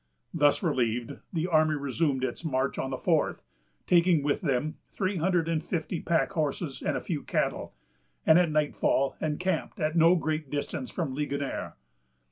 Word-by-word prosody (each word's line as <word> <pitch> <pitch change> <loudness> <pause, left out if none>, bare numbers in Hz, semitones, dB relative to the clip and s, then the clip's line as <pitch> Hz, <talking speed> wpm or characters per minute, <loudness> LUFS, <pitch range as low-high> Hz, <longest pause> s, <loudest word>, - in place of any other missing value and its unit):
Thus 145 +2 +3
relieved, 120 -7 -1
the 165 -2 -1
army 155 -3 +3
resumed 140 -1 -1
its 130 +5 -3
march 135 -3 -1
on 130 - -2
the 130 - -3
fourth, - - 0 0.4
taking 170 -3 +4
with 145 0 0
them 145 0 -1
three 190 -1 -2
hundred 170 0 +1
and 165 -2 0
fifty 170 0 -3
pack 170 +3 +1
horses 155 -4 -2
and - - 0
a - - -4
few - - -3
cattle, - - -2 0.5
and 160 +2 +7
at 175 -2 +3
nightfall 150 -2 +1
encamped 160 +3 -2
at 155 0 0
no 165 +2 +6
great 155 -3 -2
distance 145 - -3
from 160 -7 -3
Ligonier. 140 0 -3
155 Hz, 160 wpm, -28 LUFS, 140-170 Hz, 0.5 s, and